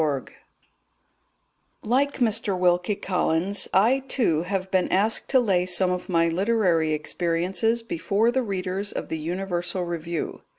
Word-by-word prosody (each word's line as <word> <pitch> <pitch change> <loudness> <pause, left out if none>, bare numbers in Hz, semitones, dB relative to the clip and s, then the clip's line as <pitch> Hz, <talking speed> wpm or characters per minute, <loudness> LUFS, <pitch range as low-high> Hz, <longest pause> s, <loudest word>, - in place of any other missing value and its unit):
Like 270 +6 +1
Mr. 215 -5 0
Wilkie 180 +2 +2
Collins, 185 0 0
I, 230 +8 +4
too, 170 - +1
have 190 +1 -3
been 185 -1 +1
asked 210 +4 +2
to 265 - +5
lay 185 -7 +1
some 180 0 +2
of 180 +1 -4
my 165 -2 +3
literary 180 -3 +1
experiences 175 +9 -1
before 205 +4 0
the 260 +1 +1
readers 195 -2 -3
of - - -5
the 160 - -3
Universal 180 +2 -3
Review. 170 -1 -4
185 Hz, 130 wpm, -24 LUFS, 175-210 Hz, -, to